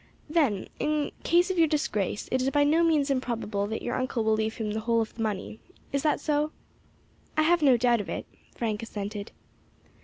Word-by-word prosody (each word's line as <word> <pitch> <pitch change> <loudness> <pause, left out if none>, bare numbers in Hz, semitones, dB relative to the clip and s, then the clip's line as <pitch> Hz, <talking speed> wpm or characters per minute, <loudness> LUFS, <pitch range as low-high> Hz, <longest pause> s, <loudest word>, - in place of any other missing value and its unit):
"Then, 290 - +1
in 300 -1 0
case 350 +3 +3
of 365 - -1
your 325 - +6
disgrace, 210 - -1
it 255 - +2
is 260 - +2
by 290 +1 +3
no 315 +4 +4
means 300 -4 +3
improbable 230 -6 -1
that 220 +1 -4
your 240 - -2
uncle 255 -2 -1
will 220 0 +3
leave 220 0 0
him 215 -2 -3
the 215 - -2
whole 230 +1 +1
of 225 - -2
the 230 - -7
money. 215 0 -3 0.3
Is 280 - 0
that 300 0 +2
so? 300 0 0 0.9
"I 310 - +5
have 340 +1 +3
no 265 -4 +6
doubt 240 -1 +3
of - - -8
it," - - -4 0.3
Frank 220 -2 -2
assented. 205 -1 -5
245 Hz, 205 wpm, -27 LUFS, 220-300 Hz, 0.9 s, your